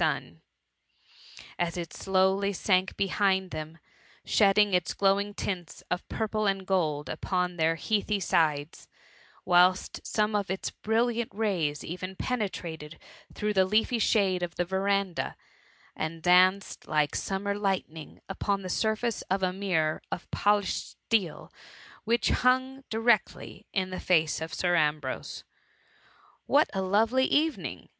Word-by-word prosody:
JIT - - +4
sun, - - -4 1.2
as 175 0 -1
it 170 -2 -5
slowly 195 +1 +1
^nk 185 0 +1
behind 190 -1 +1
tbemi 155 +1 -6 0.5
shedding 205 -1 +4
its 180 -3 +1
glowing 200 +1 +1
tints 180 -6 -5
of 180 - -3
purple 215 -1 -1
and 195 -1 -1
gold 155 -6 0
upon 180 +2 -2
their 165 -1 +2
heathy 210 +3 0
sides; 160 -5 0 0.6
whilst 180 +1 +3
some 210 0 0
of 200 -2 -1
its 190 +1 -3
brilliant 230 +1 0
rays 180 -9 -1
ev&a 185 +3 -6
penetrated 175 -10 -4 0.4
through 210 0 -1
the 190 -2 +4
leafy 220 +5 +1
shade 195 -5 +2
of 175 -1 -4
the 175 - 0
verandah, 190 0 -1 0.6
and 160 +1 -4
danoed 185 +2 +3
like 150 -1 +1
summer 200 +1 -2
light 195 -2 -1
ning 155 -1 -11
upon 195 +1 -2
the 185 - -5
surface 220 +3 0
of 190 +1 0
a 180 -1 +1
mirror 180 -5 0
of 180 - -4
poUsbed 205 -1 0
steel 200 -8 0 0.5
which 230 +1 +2
hung 260 +2 +1
directly 225 0 0
in 185 -2 -1
the 185 - -4
face 160 -4 +2
o( 160 - -2
Sir 175 +2 0
Ambrose* 150 -4 -1 0.5
" - - -31 0.3
What 295 +2 +3
a 195 - -1
lovely 225 +7 +2
evening!'' 310 +3 -1
190 Hz, 135 wpm, -28 LUFS, 175-210 Hz, 1.2 s, JIT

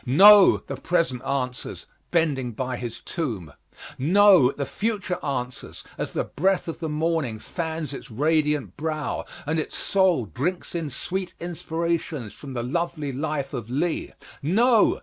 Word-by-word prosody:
No! 195 +10 +8
the - - -5
present 165 -8 0
answers, 130 -2 -3 0.2
bending 140 -8 +1
by 130 +3 -3
his 120 -2 -6
tomb. 110 - -4 0.5
No! 180 -2 +6
the 140 - -3
future 200 - -2
answers 125 -3 -4
as - - -4
the - - 0
breath 190 +4 0
of 165 - -5
the 160 -2 -3
morning 155 -6 0
fans 160 - -4
its 135 - -8
radiant 150 +3 +1
brow, 155 -1 -2 0.2
and 160 +2 0
its 155 - -4
soul 185 - +2
drinks 160 - -3
in 165 -3 -2
sweet 180 +7 -4
inspirations 165 - -3
from 135 -3 -9
the 120 - -2
lovely 155 +1 -2
life 140 0 -2
of 115 -2 -5
Lee. 155 +6 -1 0.3
No! 220 - +4
155 Hz, 145 wpm, -25 LUFS, 130-170 Hz, 0.5 s, No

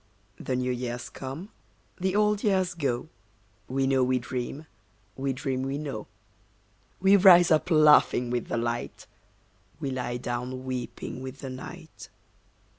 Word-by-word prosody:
The 130 - -2
new 125 0 0
years 120 -1 -4
come, 140 +9 -7 0.5
the 190 +1 0
old 210 0 +2
years 190 -4 +2
go, 140 -4 -2 0.6
We 135 +1 0
know 135 -1 +3
we 130 0 +2
dream, 125 +4 -5 0.5
we 135 0 -1
dream 130 0 -2
we 135 +1 -2
know. 140 -8 -5 0.9
We 195 +2 +6
rise 180 -3 +7
up 155 +3 +3
laughing 150 -6 +5
with 120 -2 -2
the - - -2
light, 120 0 -3 0.7
We 135 - -3
lie 125 -1 -3
down 125 +1 -4
weeping 130 0 -5
with 130 +1 -8
the 135 -2 -5
night. 160 +5 -10
135 Hz, 140 wpm, -27 LUFS, 125-160 Hz, 0.9 s, rise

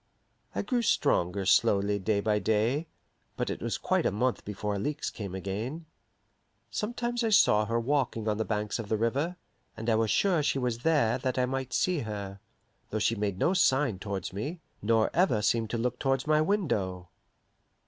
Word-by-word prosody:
I - - -1
grew 250 -3 0
stronger 100 - +1
slowly 100 +2 +3
day 100 +1 0
by 105 0 +1
day, 110 - +1 0.5
but - - -1
it - - -5
was - - -2
quite - - +1
a - - 0
month 125 +5 0
before 105 0 -3
Alixe 145 +10 -2
came 100 -4 -6
again. 110 - -4 0.9
Sometimes 240 +2 -2
I 225 - +2
saw 110 - +5
her 115 +1 +1
walking 120 -3 0
on 105 -1 +1
the 110 - 0
banks 105 0 -2
of 110 -3 -6
the 110 - +1
river, 140 +10 0 0.4
and 115 +1 -1
I - - +4
was 110 0 +2
sure 180 - +3
she 140 - +1
was 125 -3 -1
there 130 -5 +2
that 130 0 -2
I 125 - +3
might 130 0 -3
see 180 +7 +1
her, 100 -4 -5 0.5
though 110 - -2
she 110 +2 +2
made 100 -3 -2
no 175 - +2
sign 130 - +2
towards 95 -3 -4
me, 145 - -4 0.2
nor 110 +1 +2
ever 155 - +3
seemed 110 +1 +1
to 120 - -2
look 125 +1 -2
towards 135 -1 0
my 155 0 +3
window. 105 - -1
115 Hz, 185 wpm, -29 LUFS, 105-145 Hz, 0.9 s, saw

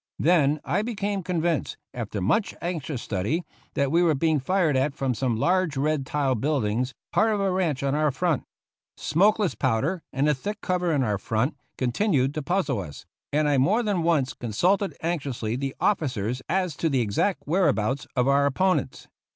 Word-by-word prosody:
Then 155 -3 +3
I 195 - +1
became 205 -3 -2
convinced, 170 -3 -1 0.2
after 110 -4 -4
much 195 - +1
anxious 160 -7 -4
study, 105 - -1 0.3
that 140 -1 +1
we 170 +2 +4
were 165 -3 +3
being 155 +1 +2
fired 170 +1 +1
at 135 +2 +1
from 135 -2 0
some 120 0 -1
large 180 +2 +1
red 145 -1 0
tiled 135 -6 0
buildings, 125 -4 0 0.2
part 220 +2 +3
of 210 - 0
a 195 -1 +1
ranch 170 -8 0
on 140 0 +1
our 150 +1 +2
front. 150 +1 0 0.5
Smokeless 200 +5 +2
powder, 135 +8 0
and 140 +2 +1
the 150 - +4
thick 205 +10 -5
cover 180 -2 0
in 145 -4 +2
our 105 -4 0
front, 115 +8 -1 0.2
continued 135 - +1
to 155 - -3
puzzle 155 - 0
us, 75 -7 -8 0.3
and 150 +1 +2
I 145 -2 +3
more 205 - +3
than 205 -5 0
once 160 -6 +1
consulted 180 - 0
anxiously 140 -9 -2
the 135 +1 -3
officers 125 - 0
as 180 -3 0
to 165 - +1
the 135 -4 +2
exact 115 - 0
whereabouts 140 - +1
of 125 0 +2
our 140 +1 +4
oppo 185 +7 +2
nents. - - -9
150 Hz, 180 wpm, -25 LUFS, 130-180 Hz, 0.5 s, we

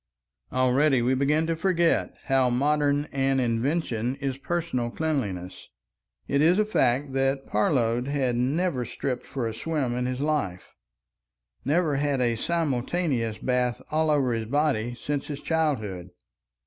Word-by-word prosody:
Already 130 +1 +3
we 125 +2 +2
begin 145 +4 +2
to 165 0 0
forget 170 -1 +1
how 135 -2 +2
modern 145 +3 +2
an 135 -1 +1
invention 120 0 0
is 135 -2 -3
personal 140 -5 -2
cleanliness. 110 - -3 0.6
It 140 - +1
is 170 +4 +5
a 215 - +3
fact 135 - +1
that 135 0 0
Parload 120 +2 +1
had 135 -4 0
never 135 +3 0
stripped 125 +1 -4
for 130 -3 -3
a 115 - -2
swim 140 0 -2
in 125 +1 -1
his 130 0 -3
life; 140 -12 -2 0.9
never 150 0 +1
had 140 -1 0
a 120 -2 +1
simultaneous 135 -4 -1
bath 125 -1 0
all 155 +1 +2
over 140 -5 +2
his 115 -1 -3
body 130 -4 0
since 145 +2 -3
his 145 -2 -5
childhood. 110 - -1
135 Hz, 140 wpm, -26 LUFS, 120-150 Hz, 0.9 s, is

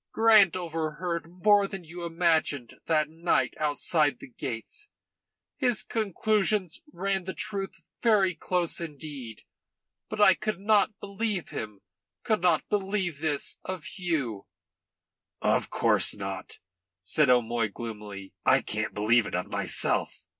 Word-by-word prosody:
"Grant 215 -5 +6
overheard 165 0 -3
more 200 +3 +3
than 195 -2 -7
you 175 +2 -9
imagined 165 -7 +1
that 155 -2 +2
night 165 +3 0
outside 150 0 +1
the 130 - -12
gates. 135 - -6 0.7
His 250 -5 +1
conclusions 210 - 0
ran 195 -2 -2
the 190 - -5
truth 200 -2 -4 0.2
very 205 -5 +4
close 175 0 -1
indeed. 145 -7 -7 0.7
But 215 - -5
I 200 -2 +7
could 215 0 -3
not 210 +1 +2
believe 200 -2 -3
him, 105 -2 -6 0.4
could 215 -5 +1
not 170 -3 +2
believe 195 -6 -1
this 150 -2 -1
of 185 -3 -5
you."' 140 - -2 0.9
"Of - - +1
course - - +4
not," 95 -1 -6 0.5
said 150 +8 +3
O'Moy 120 -2 +3
gloomily. 105 -3 -8
"I - - +4
can't 110 0 -3
believe 110 +2 +3
it - - -4
of 90 - -3
myself." - - 0
170 Hz, 125 wpm, -28 LUFS, 135-195 Hz, 0.9 s, I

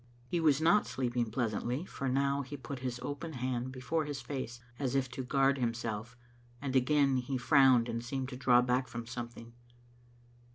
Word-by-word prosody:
He 170 +7 -1
was 155 -3 +4
not 170 +6 +4
sleeping 120 -3 -1
pleasantly, 120 - -1
for 135 -7 -3
now 140 +2 +1
he 145 +2 -7
put 130 +1 -6
his 125 -1 -3
open 150 +3 -4
hand 125 0 -2
before 150 +5 -1
his 145 -2 -4
face, 130 -4 -5 0.2
as 135 -2 -1
if 135 -1 +2
to 130 +1 -4
guard 135 +1 +2
himself, 115 0 -3 0.4
and 135 0 -3
again 135 +1 +4
he 130 +1 -2
frowned 130 -2 +5
and 115 0 -3
seemed 130 +1 -3
to 130 - -6
draw 125 -1 +4
back 125 +1 +1
from 115 -1 -6
something. 120 0 -7
130 Hz, 175 wpm, -32 LUFS, 120-140 Hz, 0.4 s, frowned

